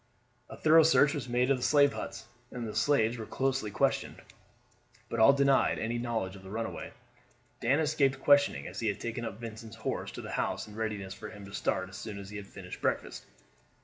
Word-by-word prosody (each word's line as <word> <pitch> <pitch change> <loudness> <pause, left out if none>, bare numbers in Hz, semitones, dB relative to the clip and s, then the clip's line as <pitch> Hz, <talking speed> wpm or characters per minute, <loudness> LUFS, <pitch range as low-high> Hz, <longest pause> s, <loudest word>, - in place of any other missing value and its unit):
A - - -9
thorough 160 +1 +6
search 150 -2 +5
was 140 -4 -4
made 125 +2 +2
of 135 - +3
the 125 - -5
slave 145 -1 +5
huts, - - -6 0.2
and 120 -2 -5
the 105 - -5
slaves 115 -1 +2
were 110 - -6
closely 135 -4 -1
questioned, 100 - 0 0.9
but 115 - -2
all 110 +5 +8
denied 140 -1 +3
any 115 +1 -2
knowledge 115 -6 -2
of 95 - -11
the 95 - -11
runaway. 115 +2 -4 0.7
Dan 135 +6 +2
escaped 145 -3 +2
questioning, 145 +1 +4
as - - -6
he 115 - -1
had 100 0 -1
taken 120 +1 -4
up 110 -2 -5
Vincent's 115 -1 -8
horse 110 - -3
to - - -6
the - - -7
house - - -2
in 105 - -12
readiness 105 -3 -3
for 110 +1 -8
him 105 -2 -10
to 100 - -12
start 95 -2 -1
as 95 +1 -10
soon 110 -4 -6
as 100 0 -9
he 105 - -6
had 100 -1 -8
finished - - -9
breakfast. - - -2
115 Hz, 215 wpm, -30 LUFS, 105-135 Hz, 0.9 s, all